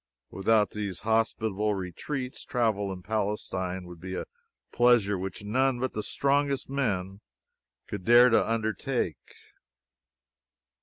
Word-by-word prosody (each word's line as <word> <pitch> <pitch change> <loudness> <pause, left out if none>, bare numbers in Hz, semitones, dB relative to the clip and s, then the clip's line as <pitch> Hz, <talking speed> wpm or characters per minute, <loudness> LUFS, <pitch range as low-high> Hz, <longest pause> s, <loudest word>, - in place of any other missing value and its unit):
Without 105 +2 +2
these 100 -3 -4
hospitable 110 -2 +1
retreats, 125 - -5
travel 110 -5 0
in 90 -1 -7
Palestine 95 -4 -2
would 90 -1 -11
be 95 +2 -6
a - - -3 0.5
pleasure 120 -5 +4
which 95 +2 -5
none 130 +4 +1
but 130 +1 -2
the 105 - -2
strongest 140 +3 0
men 100 -8 -1 0.6
could 100 -3 -6
dare 120 +5 +7
to 115 - +3
undertake. 110 - -2
105 Hz, 115 wpm, -28 LUFS, 95-120 Hz, 0.6 s, dare